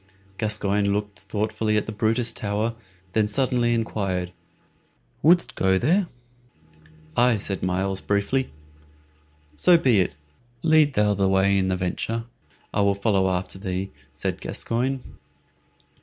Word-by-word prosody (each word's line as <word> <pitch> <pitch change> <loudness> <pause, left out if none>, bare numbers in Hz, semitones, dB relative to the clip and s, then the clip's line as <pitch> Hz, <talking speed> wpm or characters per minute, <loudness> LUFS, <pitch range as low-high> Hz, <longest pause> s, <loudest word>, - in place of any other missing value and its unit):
Gascoyne 105 -2 +1
looked 105 0 -3
thoughtfully 110 0 -1
at 105 - 0
the - - -5
Brutus 115 +2 0
Tower, 105 +2 -1
and 115 - -9 0.4
then 110 -1 +2
suddenly 125 +1 +1
inquired, 95 -6 -2 0.9
"Wouldst 175 +2 +4
go 95 0 +2
there?" 180 - +2 1.1
"Aye," 120 -2 +4
said 100 -1 -3
Myles, 95 +1 -1
briefly. 105 +6 0 1.0
"So 170 - +5
be 125 -10 +3
it. 90 - 0 0.5
Lead 155 -3 +4
thou 105 0 +3
the 100 -1 +1
way 95 +1 +3
in 95 -1 +1
the 95 0 0
venture, 110 +5 -2 0.5
I 100 - +1
will 100 0 +3
follow 100 -2 +1
after 90 +1 -3
thee," 95 0 -3 0.2
said - - -4
Gascoyne. 130 +3 -2
105 Hz, 130 wpm, -24 LUFS, 95-115 Hz, 1.1 s, So